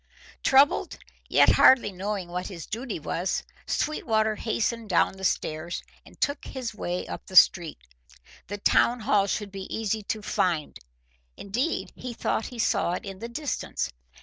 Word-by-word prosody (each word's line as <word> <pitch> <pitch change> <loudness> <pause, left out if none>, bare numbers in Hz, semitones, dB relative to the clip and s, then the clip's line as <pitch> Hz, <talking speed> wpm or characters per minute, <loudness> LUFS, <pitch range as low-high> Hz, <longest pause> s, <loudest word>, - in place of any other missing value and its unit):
Troubled, 275 +2 +4 0.3
yet - - +6
hardly 245 -6 +6
knowing 195 0 -3
what 180 +1 -4
his 170 -5 -8
duty 230 -3 -4
was, 170 +4 -2 0.2
Sweetwater 220 -7 0
hastened 230 0 -2
down 180 - +3
the 190 0 -11
stairs, 160 -1 -2 0.2
and - - -18
took 285 0 0
his 250 -4 -5
way 180 -4 -3
up - - -8
the 190 - -9
street. 170 -3 +6 0.7
The 205 +3 -4
town 235 +4 +3
hall 205 -2 +3
should 205 0 -2
be 195 -1 -7
easy 220 -1 -1
to 215 0 -4
find; 170 -7 -1 0.6
indeed, 245 +11 -2
he 250 -2 -7
thought 220 - -1
he 245 - -10
saw 200 -5 +1
it 180 - -4
in 195 -1 -7
the 230 +2 -6
distance. 255 - -3
210 Hz, 155 wpm, -26 LUFS, 185-235 Hz, 0.7 s, yet